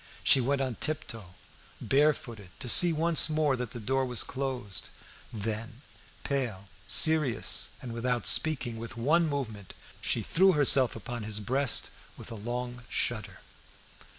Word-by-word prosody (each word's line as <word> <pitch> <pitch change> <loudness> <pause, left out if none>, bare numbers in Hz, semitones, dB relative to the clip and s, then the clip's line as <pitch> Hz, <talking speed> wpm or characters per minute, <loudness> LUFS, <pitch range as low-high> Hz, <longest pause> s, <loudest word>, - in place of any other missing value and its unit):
She 135 - +5
went 140 +3 -1
on 130 -4 -3
tiptoe, 115 - -4 0.4
barefooted, 135 -8 0
to 125 - -5
see 175 +9 +7
once 165 0 +3
more 155 -3 +1
that 125 -2 -5
the 120 - -9
door 130 +5 -1
was 125 -4 -1
closed, 130 -7 -4 0.4
then, 110 +3 -6 0.4
pale, 125 -9 -3 0.2
serious, 140 +5 +2
and, 120 -2 -6
without 120 +1 -2
speaking, 135 -7 +1
with 115 +1 -8
one 160 +8 +2
movement, 110 - -5 0.3
she - - -1
threw 190 +2 +3
herself 135 -3 +5
upon 120 +2 -6
his 105 0 0
breast 130 +3 0 0.3
with - - -10
a - - -6
long 120 +3 -5
shudder. 110 -4 -3
125 Hz, 140 wpm, -28 LUFS, 115-140 Hz, 0.4 s, see